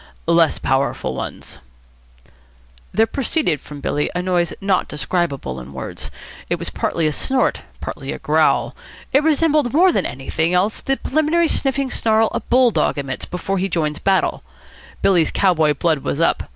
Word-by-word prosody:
"Less 165 -1 +3
powerful 135 - -1
ones." - - -6 1.3
There 220 - +3
proceeded 255 - 0
from 145 -1 -10
Billy 145 +1 -1
a 180 - -1
noise 175 -2 +1
not 195 -2 +1
describable 140 - -2
in 65 +2 -10
words. 65 - -6 0.4
It - - +1
was - - -5
partly 165 - -1
a 155 - +2
snort, 265 - 0 0.2
partly - - -5
a - - -4
growl. - - +1 0.4
It 275 - +5
resembled 305 -4 +2
more 360 +5 +5
than - - 0
anything 160 +7 -1
else 195 +5 +1
the 270 0 0
preliminary 315 +3 +1
sniffing 270 -3 0
snarl 220 0 +2
a - - -1
bull 250 -1 +3
dog - - +1
emits 135 -2 -4
before 190 +2 -3
he 195 +2 -1
joins 155 -4 -1
battle. 195 -1 +1 0.6
Billy's 175 -5 +4
cow 190 -2 +3
boy 155 -2 +3
blood 160 0 +1
was 140 - -3
up. 165 - +1
180 Hz, 165 wpm, -20 LUFS, -, 1.3 s, It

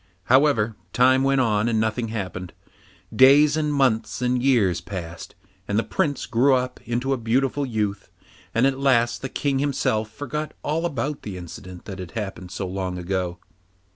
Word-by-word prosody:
However, 125 -4 +3 0.2
time 130 +2 +4
went 135 0 +3
on 110 -2 +1
and 110 -2 +1
nothing 110 +2 0
happened. 95 -5 -5 0.6
Days 145 +3 +6
and 150 -1 0
months 135 -6 +1
and 125 0 +1
years 105 -11 +2
passed, 85 -2 -7 0.3
and 100 - 0
the 115 - +2
Prince 155 -7 -1
grew 125 +4 +3
up 125 0 -2
into 125 +3 -1
a - - 0
beautiful 130 +4 0
youth, 105 -4 -2 0.4
and 115 +3 +2
at 135 0 +1
last 120 -4 +2
the 135 - -4
King 140 0 -1
himself 130 -6 0
forgot 145 +5 -5
all 165 +3 0
about 145 -1 -3
the 100 -3 -6
incident 90 +1 -10
that 95 -2 -7
had 90 -2 -8
happened 95 -4 -5
so 90 +2 -4
long 95 -1 -3
ago. 90 -1 -2
120 Hz, 170 wpm, -23 LUFS, 100-135 Hz, 0.6 s, Days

